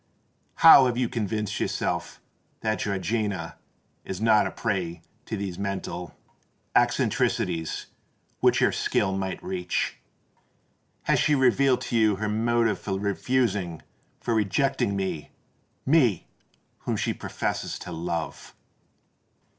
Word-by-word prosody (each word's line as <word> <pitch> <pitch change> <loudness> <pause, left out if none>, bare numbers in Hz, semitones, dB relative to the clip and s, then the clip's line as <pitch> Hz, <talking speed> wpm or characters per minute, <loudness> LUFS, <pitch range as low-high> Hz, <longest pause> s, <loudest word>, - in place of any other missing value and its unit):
How 140 -5 +10
have 120 -1 -1
you 125 -1 +1
convinced 105 -2 -2
yourself - - -2 0.4
that 110 -1 0
Georgiana 100 -3 -2 0.5
is 95 - -5
not 110 -2 +4
a - - -3
prey 85 -3 -3 0.2
to 110 - -3
those 95 -3 -4
mental 95 -3 -4 0.6
eccentricities 80 -1 +1 0.5
which - - +3
your - - +4
skill 95 0 0
might 95 -1 -3
reach? 90 -2 -2 1.1
Has - - +2
she 150 - +3
revealed 130 0 +3
to 120 - -3
you 110 -3 +4
her 105 +2 -3
motive 115 +1 +1
for 95 -2 -3
refusing—for 100 -2 -2
rejecting 110 +1 +1
me,—me 95 - -1 0.5
whom - - -2
she - - 0
professes - - -3
to - - -8
love?" 80 -2 -4
100 Hz, 110 wpm, -26 LUFS, 95-115 Hz, 1.1 s, How